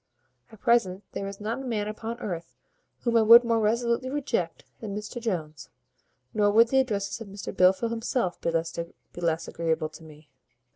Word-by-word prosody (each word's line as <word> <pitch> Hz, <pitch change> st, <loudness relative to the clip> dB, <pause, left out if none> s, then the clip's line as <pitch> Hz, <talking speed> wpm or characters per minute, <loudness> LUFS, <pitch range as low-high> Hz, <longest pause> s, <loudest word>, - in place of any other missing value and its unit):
At 220 Hz, -, -16 dB
present 210 Hz, -6 st, +2 dB
there 195 Hz, -, -4 dB
is 195 Hz, 0 st, -7 dB
not 220 Hz, +4 st, -3 dB
a -, -, -7 dB
man 220 Hz, -5 st, -2 dB
upon 225 Hz, +2 st, -5 dB
earth 170 Hz, -6 st, -5 dB, 0.5 s
whom 235 Hz, -1 st, 0 dB
I -, -, +6 dB
would 230 Hz, +2 st, +9 dB
more 230 Hz, -1 st, +2 dB
resolutely 235 Hz, +3 st, +1 dB
reject 260 Hz, -, -2 dB
than 205 Hz, -3 st, -5 dB
Mr 210 Hz, +3 st, -6 dB
Jones; 160 Hz, -9 st, -4 dB, 0.6 s
nor 205 Hz, -1 st, +3 dB
would 230 Hz, +3 st, +5 dB
the 265 Hz, -, +4 dB
addresses 210 Hz, -4 st, -1 dB
of 225 Hz, -, -7 dB
Mr 200 Hz, 0 st, -7 dB
Blifil 190 Hz, +5 st, +4 dB
himself 230 Hz, -4 st, -1 dB
be 170 Hz, +1 st, -4 dB
less 165 Hz, -1 st, 0 dB
agreeable 160 Hz, -2 st, -1 dB
to 165 Hz, -, -13 dB
me." 150 Hz, -1 st, -15 dB
210 Hz, 175 wpm, -27 LUFS, 175-235 Hz, 0.6 s, would